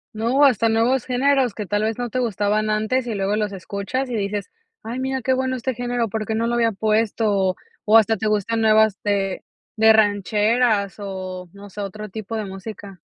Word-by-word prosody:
No, 235 +6 +2
hasta 230 -4 +3
nuevos 230 +3 +2
géneros 260 -2 +2
que 210 - -4
tal 205 +2 -1
vez 220 +1 -1
no 245 -2 -4
te 255 - -1
gustaban 215 -2 0
antes, 220 +4 0
y 225 - -2
luego 200 +1 0
los 210 -1 -1
escuchas 200 +8 -4
y - - -2
dices: 205 -1 -3 0.3
"Ay 235 +3 -5
mira 265 0 -2
qué 260 - +2
bueno 260 0 -1
este 255 +1 -2
género, 245 0 -2
¿por 215 0 -4
qué 220 - -1
no 230 - 0
lo 235 - -1
había 230 -1 +2
puesto?", 215 +2 0
o 190 -2 +1 0.3
o 220 +1 +6
hasta 225 0 +4
te 220 +1 -2
gustan 215 +2 0
nuevas 220 -1 +4
de 195 -2 -1 0.3
de 220 0 +6
rancheras, 210 0 +2
o 185 -2 -6
no 200 0 -12
sé 205 - -6
otro 210 +1 -6
tipo 220 +2 -6
de 215 - -3
música. 195 -1 -9
220 Hz, 205 wpm, -22 LUFS, 200-235 Hz, 0.3 s, o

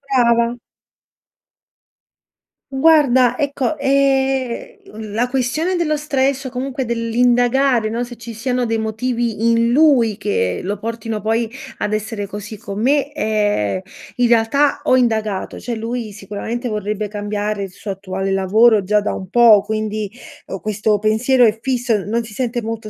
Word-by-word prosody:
Brava. 235 -1 +3 2.1
Guarda 270 -4 +4
ecco, 285 +1 -1
ehm, 270 -2 0 0.2
l 215 -2 -7
la 240 +3 0
questione 305 +8 0
dello 305 -3 +1
stress 275 -2 0
o 260 - -3
comunque 260 +1 -3
dell'indagare, 240 +1 +2
no, 235 +2 -2
se 240 -1 -9
ci 230 0 -8
siano 245 +2 -1
dei 225 0 0
motivi 230 0 -1
in 230 0 +3
lui, 250 -7 +4
che 95 - -1
lo 200 +3 -3
portino, 225 -1 -4
poi, 225 +1 0 0.3
ad 210 0 -2
essere 215 -1 -3
così 210 +2 -7
con 205 -1 -6
me, 285 +3 +1
ehm, 210 - 0 0.4
in 245 -1 +3
realtà 240 +5 +2
ho 255 - +4
indagato. 220 -5 -1
Cioè, 240 - -4
lui 230 0 -4
sicuramente, 210 +5 -5
vorrebbe 210 -1 -3
cambiare 205 0 -3
il 195 - -6
suo 200 +1 -7
attuale 195 0 -4
lavoro 205 +3 +4
già 210 +2 +2
da 205 - -2
un 190 -1 -7
po', 225 -3 +6
quindi, 215 -1 -3 0.4
o 195 - -5
questo 210 0 0
pensiero 235 +4 +3
è 215 -1 +2
fisso, 245 -6 0
non 230 +3 -1
si 220 - -11
sente 240 +1 -2
molto 225 -1 -5
230 Hz, 150 wpm, -19 LUFS, 210-250 Hz, 2.1 s, po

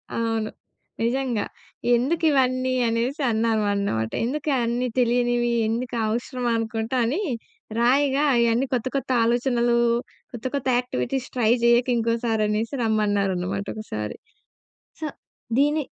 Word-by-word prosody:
అవును. 225 -1 -1 0.5
నిజంగా. 245 -2 0 0.5
ఎందుకు 315 +8 0
ఇవన్నీ 255 -2 +2
అనేసి 240 +6 -1
అన్నాం 225 0 +1
అన్నమాట. 110 - -1 0.2
ఎందుకు 295 +5 -2
అన్నీ 240 +2 0
తెలియనివి 240 0 +2 0.2
ఎందుకు 240 +2 -2
అవసరం 245 +2 -3
అనుకుంటా 225 +2 -2
అని, 285 - 0 0.6
రాయగా 275 +3 +3
అయ్యన్నీ 235 +2 +3
కొత్త 245 0 0
కొత్త 275 - -2
ఆలోచనలు, 240 0 +2 0.6
కొత్త 240 0 -8
కొత్త 280 -1 -2
యాక్టివిటీస్ 250 - -2
ట్రై 230 -3 +3
చేయక 235 +1 +4
ఇంకోసారి 230 -1 0
అనేసి 220 +5 -1
రమ్మన్నారన్నమాట 200 -3 0
ఒకసారి 110 - -5 0.8
సో, 315 - -3 0.5
దీన్ని 295 +2 +3
235 Hz, 115 wpm, -24 LUFS, 220-255 Hz, 0.8 s, చేయక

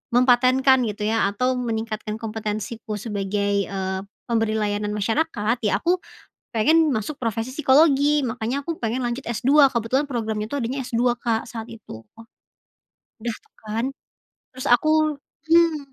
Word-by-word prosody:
mempatenkan 255 +2 +5
gitu 210 0 -5
ya, 220 -1 +2
atau 250 +6 0
meningkatkan 220 -2 -3
kompetensiku 215 0 -4
sebagai, 200 -1 -1
eee, 190 -1 -3 0.3
pemberi 225 -2 0
layanan 210 -1 -1
masyarakat, 225 +1 0
ya - - +1
aku 355 +8 +1 0.6
pengen 310 +7 +4
masuk 225 +7 -3
profesi 230 0 -2
psikologi, 295 0 +4
makannya 250 +2 -2
aku 330 +3 -4
pengen 230 +2 -2
lanjut 240 +2 -3
S-2, 275 +5 +4
kebetulan 250 +5 0
program 220 -5 -3
itu 220 - -7
adanya 265 0 -2
S-2, 240 +1 +1
Kak, 230 -1 -1
saat 225 0 -6
itu. 160 - -11 1.2
Udah 230 0 -3
tuh - - -33
kan. 220 +3 -2 0.7
Terus 260 0 -7
aku 310 +4 +3 0.3
mmm, 335 -1 +5
235 Hz, 135 wpm, -23 LUFS, 215-270 Hz, 1.2 s, mempatenkan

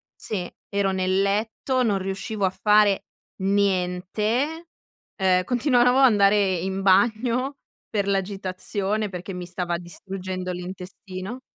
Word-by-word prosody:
sì, 185 -5 -4 0.2
ero 200 -1 +1
nel 185 0 +1
letto, 220 +6 0
non 210 -4 +2
riuscivo 195 +2 -4
a - - +3
fare 210 0 +3 0.4
niente, 200 - 0 0.5
ehm, 185 -2 +3
continuavo 250 0 +3
ad 270 - +7
andare 200 -4 +4
in 190 +2 -3
bagno 235 +7 +2 0.3
per 200 -2 -1
l'agitazione 195 +1 -1
perché 185 +1 -6
mi 180 -1 -5
stava 175 -1 -2
distruggendo 185 +1 -5
l'intestino. 185 +4 -7
195 Hz, 115 wpm, -24 LUFS, 185-215 Hz, 0.5 s, ad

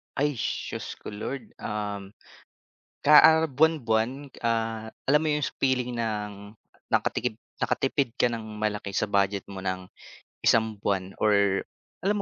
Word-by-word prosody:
Ay, 145 +2 +2
shos - - -3
ko - - -9
Lord, 115 +3 -5
um, 105 -2 -4 1.0
ka, 150 +1 +10
ah, 160 0 +6
buwan-buwan, 135 -3 +1
ah, 115 -1 -1 0.2
alam 150 +3 +4
mo 155 - 0
yung 150 -1 +1 0.2
feeling 125 -2 +1
ng, 105 -2 -4 0.3
nakatikip - - 0 0.2
nakatipid 135 -1 +1
ka - - +4
ng 115 -1 -2 0.2
malaki 105 -2 -2
sa 100 - 0
budget 100 -1 +1
mo 95 -1 -8
ng, 95 -1 -3 0.5
isang 110 -2 +2
buwan 95 -2 -1
or 100 -2 +3 0.3
alam 200 +3 +1
110 Hz, 135 wpm, -27 LUFS, 100-135 Hz, 1.0 s, ka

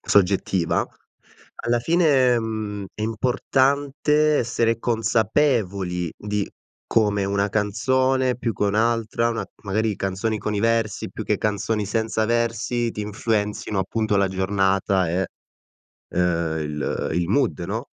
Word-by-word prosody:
soggettiva. 95 -3 +2 0.8
Alla 120 0 +2
fine, 135 -5 +3
mhmm, 110 -3 -4
è 105 - -6
importante 140 +6 +2
essere 115 -1 +1
consapevoli 110 - 0
di 105 -1 -2 0.4
come 105 -3 +2
una 100 +1 0
canzone, 130 +5 +1
più 115 -1 -2
che 100 - -4
un'altra, 115 +2 +1
una 115 - -2 0.2
magari 110 +1 0
canzoni 100 +3 -2
con 105 0 -3
i 100 - 0
versi 115 -2 0
più - - -6
che - - +1
canzoni 105 +1 -1
senza 110 +1 0
versi, 115 +1 0
ti - - -5
influenzino, 105 -1 -1
appunto, 105 +2 0
la 100 -1 +3
giornata, 95 -1 +1
eh, 95 +3 0 0.8
ehm, 85 -3 0
il 75 -1 -3
il 85 +1 0
mood, 140 +7 +1
no? 110 +6 -4
110 Hz, 125 wpm, -23 LUFS, 100-115 Hz, 0.8 s, fine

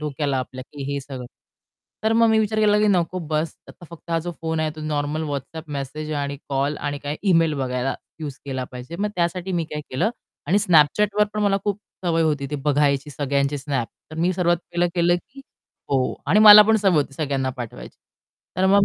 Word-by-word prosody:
डोक्याला 145 -2 -1
आपल्या 130 0 -5
की 145 -2 -7
हे 140 - -2
सगळं. 130 -2 -8 0.8
तर 220 - +3
मग 230 0 +5
मी 220 0 +4
विचार 220 0 0
केला 210 -1 +4
की 210 - +3
"नको 185 -1 +1
बस्स, 155 0 -1
आता 175 - -13
फक्त 170 0 -12
हा 165 - +2
जो 175 - -4
फोन 160 -1 -1
आहे 155 -1 0
तो - - -7
नॉर्मल 150 0 -2
WhatsApp 145 +3 -5
मेसेज 145 +2 -5
आणि 140 -1 -2
कॉल 140 +2 0
आणि 145 0 -3
काय 145 +1 -4
इमेल 165 -3 +3
बघायला 125 0 -1 0.3
युज 145 -3 -5
केला 130 -2 -3
पाहिजे." 125 +7 -8
मग 210 - 0
त्यासाठी 180 +2 -1
मी 170 -2 0
काय 150 - -4
केलं 135 - +1 0.4
आणि 190 +6 +3
Snapchatवर 200 +6 +4
पण 210 - -1
मला 200 -1 +3
खूप 205 -1 -1 0.3
सवय 165 -1 +2
होती 150 -3 0
ती 150 - -3
बघायची 145 0 +2
सगळ्यांची 140 +1 0
Snap. 135 -4 -2 0.2
तर 155 - -9
मी 175 +3 +1
सर्वात 175 -1 +2
पहिलं 175 0 -1
केलं 175 0 +3
की 260 +9 -13 0.5
हो 130 -2 +1
आणि 185 +9 +4
मला 210 0 +11
पण 220 +1 +3
सवय 195 -4 +2
होती 140 -2 +1
सगळ्यांना 140 -3 -1
पाठवायची. 110 - -8 0.6
तर 190 +1 +3
मग 200 +1 +5
155 Hz, 205 wpm, -23 LUFS, 140-180 Hz, 0.8 s, मला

